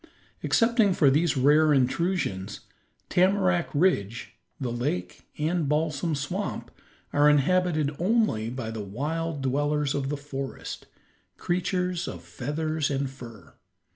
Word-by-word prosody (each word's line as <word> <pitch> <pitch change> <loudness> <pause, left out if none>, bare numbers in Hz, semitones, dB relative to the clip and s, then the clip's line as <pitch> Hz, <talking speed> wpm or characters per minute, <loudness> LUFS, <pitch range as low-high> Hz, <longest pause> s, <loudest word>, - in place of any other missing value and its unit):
Excepting 230 -4 +3
for 145 -6 +4
these 150 +1 +2
rare 150 +4 +5
intrusions, 130 - 0 0.5
Tamarack 185 -1 +2
Ridge, 130 - 0 0.3
the 125 -3 -2
lake, 115 -8 -3
and 155 0 0
Balsam 155 +1 0
Swamp, 145 +1 -4 0.4
are 145 +1 +5
inhabited 155 0 +2
only 180 - +1
by 120 -2 -5
the 110 -1 -5
wild 145 +8 -3
dwellers 145 +2 0
of 135 -1 -2
the 145 - -2
forest, 140 -1 -6 0.5
creatures 180 0 -1
of 85 -1 -7
feathers 150 - -2
and 135 -1 -1
fur. 115 -9 -12
145 Hz, 115 wpm, -26 LUFS, 130-170 Hz, 0.5 s, rare